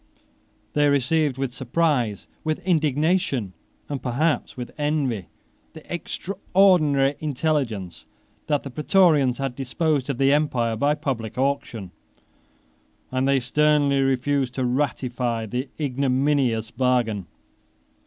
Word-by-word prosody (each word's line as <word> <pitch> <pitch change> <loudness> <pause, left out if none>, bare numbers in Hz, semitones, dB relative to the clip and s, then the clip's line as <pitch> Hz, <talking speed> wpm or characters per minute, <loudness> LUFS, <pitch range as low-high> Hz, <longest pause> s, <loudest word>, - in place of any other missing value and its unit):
They 145 0 +3
received 140 0 +1
with 135 -2 -2
surprise, 130 - 0 0.2
with 155 +2 -2
indignation, 155 - +1 0.3
and 140 -3 -4
perhaps 140 +6 -1
with 125 -1 -6
envy, 145 - -1 0.5
the 160 +2 -9
extraordinary 170 -6 +2
intelligence, 135 - -2 0.4
that 145 -2 +1
the 135 - -7
Prætorians 150 -4 +3
had 135 -2 -2
disposed 140 +1 -1
of 135 - -1
the 135 +1 +4
empire 125 -6 +1
by 145 +6 +2
public 125 -8 -4
auction; 125 -8 -2 1.2
and 130 +1 0
they 140 -1 +3
sternly 145 +2 +2
refused 135 0 0
to 130 - 0
ratify 125 -3 -1
the 125 +5 -4
ignominious 130 -4 +1
bargain. 120 -7 0
135 Hz, 110 wpm, -24 LUFS, 125-150 Hz, 1.2 s, the